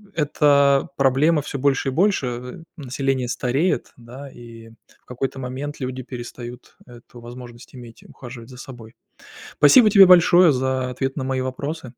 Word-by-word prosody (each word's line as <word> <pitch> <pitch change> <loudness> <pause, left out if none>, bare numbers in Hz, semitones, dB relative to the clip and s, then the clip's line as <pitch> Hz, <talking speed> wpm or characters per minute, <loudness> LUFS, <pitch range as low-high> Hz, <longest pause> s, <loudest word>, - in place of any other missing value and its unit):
эта 140 -3 +2
проблема 140 +4 +2
всё 140 - -6
больше 135 0 0
и - - -3
больше. 180 -1 0
Э, 125 +6 -8
население 135 -2 -3
стареет, 135 +9 -2
да, 125 +4 -12
и 115 -2 -14 0.3
в - - -43
какой-то 130 +2 -5
момент 135 +4 -7
люди 130 0 -5
перестают 120 -1 -10
эту 120 0 -16
возможность 120 +1 -12
иметь 120 -2 -13
и - - -18
ухаживать 120 -1 -12
за 125 - -13
собой. 120 -4 -12 0.6
Спасибо 215 - +6
тебе 195 -1 +8
большое 175 -1 +5
за 130 0 -2
ответ 135 +1 -4
на 135 - -4
мои 130 0 -2
вопросы. 140 +3 -5
130 Hz, 155 wpm, -21 LUFS, 125-145 Hz, 0.6 s, тебе